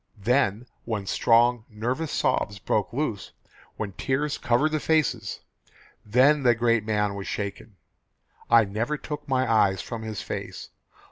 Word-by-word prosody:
Then 115 +1 +1 0.2
when 110 -4 -3
strong, 120 +4 +3
nervous 125 +8 -3
sobs 105 -1 0
broke 100 +1 -1
loose, 120 -6 -3 0.4
when 105 -2 -4
tears 140 +8 -2
covered 130 +6 +2
the 155 - 0
faces, 155 -5 0 0.6
then 130 +7 +4
the 120 -2 +4
great 115 -1 +2
man 105 -2 0
was 100 -1 -6
shaken. 100 0 -5 0.7
I 115 -2 +6
never 110 +9 -2
took 150 0 -7
my 130 -2 +1
eyes 100 -4 +3
from 115 +4 -6
his 110 -2 -5
face. - - -6
115 Hz, 140 wpm, -25 LUFS, 105-135 Hz, 0.7 s, I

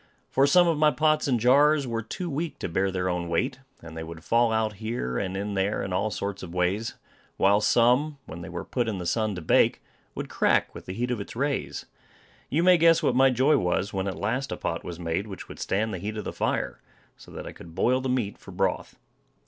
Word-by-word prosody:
For 135 +1 +4
some 175 +4 +5
of 165 -3 +1
my 155 0 +6
pots 155 +2 +2
and 125 -4 +2
jars 140 +5 +4
were 115 -2 -2
too 145 +11 -5
weak 160 +1 -3
to - - -4
bear 95 +3 0
their 90 -1 -2
own 90 -1 -2
weight; 125 +10 -1 0.2
and 80 -1 -10
they 80 - -5
would 80 0 -9
fall 115 +2 +3
out 110 -2 0
here, 110 - -3
and 95 -1 -3
in 100 +1 -3
there, 100 +2 0
in 95 - -4
all 100 +4 +1
sorts 100 -1 -4
of 90 -1 -8
ways; 95 +6 0 0.4
while 100 +2 +4
some, 125 +7 +3
when 85 +2 -8
they - - -7
were - - -5
put 120 -2 -1
in 110 -3 -2
the 90 - -5
sun 110 +3 0
to 90 - -6
bake, - - +3 0.4
would - - -4
crack - - +1
with - - -11
the 95 - -4
heat 125 +3 -1
of 120 -4 -2
its 100 - -9
rays. 140 +3 -2 0.6
You 160 +5 +1
may 180 -1 +6
guess 165 0 +5
what 125 - +2
my 135 +1 +6
joy 130 +4 +3
was 90 +3 0
when 95 0 -1
at 95 -4 -3
last 130 +9 -2
a - - -3
pot 85 - -3
was 85 -1 -7
made 85 +4 -2
which 95 -3 -8
would - - -10
stand 110 +2 -1
the 95 - -4
heat 105 +4 -4
of 105 - -4
the - - -5
fire, - - -2 0.3
so - - -16
that - - -7
I - - -6
could 85 -1 -13
boil 125 +7 +2
the 130 - -2
meat 125 -5 -1
for - - -14
broth. 95 0 -2
110 Hz, 245 wpm, -26 LUFS, 95-130 Hz, 0.6 s, my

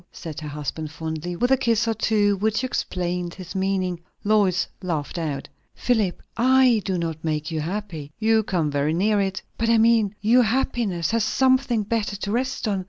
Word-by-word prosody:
said 160 -2 -7
her 155 - -7
husband 150 +1 -5
fondly, 160 +2 -5
with 245 +8 0
a 265 - +6
kiss 235 -2 +1
or 225 - +2
two 210 -2 +2
which 220 +4 0
explained 180 -7 -2
his 185 -1 -9
meaning. 190 -2 -1 0.2
Lois 205 -3 +2
laughed 170 -2 -3
out. 145 -4 -3 0.3
"Philip, 220 -7 0
I 255 -1 +4
do 190 -2 0
not 165 -2 -3
make 155 0 -2
you 160 - -2
happy." 170 -4 -5
"You 220 0 +3
come 175 -7 -1
very 145 +2 0
near 205 +3 +2
it." 190 -1 -2 0.2
"But 230 0 +1
I 230 - +5
mean 220 -2 +3
Your 235 +5 +4
happiness 220 -7 0
has 230 -1 +1
something 260 -1 +2
better 210 -1 -1
to 200 0 -4
rest 255 +1 -1
on. 200 -2 0
200 Hz, 180 wpm, -23 LUFS, 170-225 Hz, 0.3 s, a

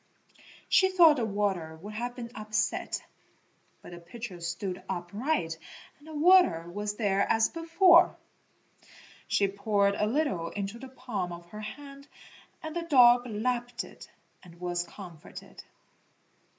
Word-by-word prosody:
She 380 0 +4
thought 335 -5 +6
the 235 - 0
water 195 -6 -2
would 210 +1 -8
have 245 +3 -4
been 235 -2 -7
upset, 215 0 -2 0.8
but - - -11
the 175 - -9
pitcher 180 +1 -9
stood 180 +2 -4
upright 175 - -2 0.4
and 295 - -18
the 315 - -9
water 300 - +5
was 205 +3 -4
there 200 -3 +1
as 225 0 +3
before. 335 +1 +4 1.1
She 200 - +2
poured 200 0 +1
a 210 +1 0
little 235 - -1
into 200 +3 -5
the 265 +1 -9
palm 240 -9 -5
of 170 0 -10
her 215 - -8
hand 280 +5 -10 0.6
and 315 0 -6
the 345 - -1
dog 250 -6 +5
lapped 240 +2 -2
it - - -13 0.3
and 170 -2 -16
was 175 -1 -2
comforted. 170 -3 -11
215 Hz, 135 wpm, -29 LUFS, 185-265 Hz, 1.1 s, thought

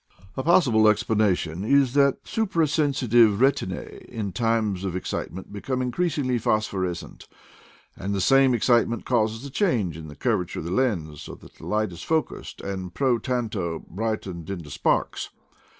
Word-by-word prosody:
A - - -2
possible 130 -10 +4
ex 105 -1 +3
planation 95 -5 0
is 135 +2 +3
that 140 -1 +3
suprasensitive 145 - +2
retinae 120 -7 0
in 110 -5 -5
times 110 -4 0
of 95 -2 -3
excitement 95 +1 -5
become 125 +5 -3
increasedly 130 -1 0
phosphorescent, 95 -6 -2 0.7
and 100 - -4
the 100 - 0
same 135 +6 +5
excitement 120 0 +2
causes 115 0 0
a 140 - -7
change 120 - 0
in 80 -1 -9
the 75 - -10
curvature 90 +5 -1
of - - -4
the 85 - -4
lens, 90 - -1
so - - -8
that - - -16
the - - -12
light 110 -2 0
is 85 - -9
focused, 160 -1 -2
and 95 -2 -5
pro 130 -4 +2
tanto 105 -11 -3
brightened 95 -4 -4
into 85 -7 -6
sparks. - - 0
110 Hz, 150 wpm, -25 LUFS, 95-130 Hz, 0.7 s, same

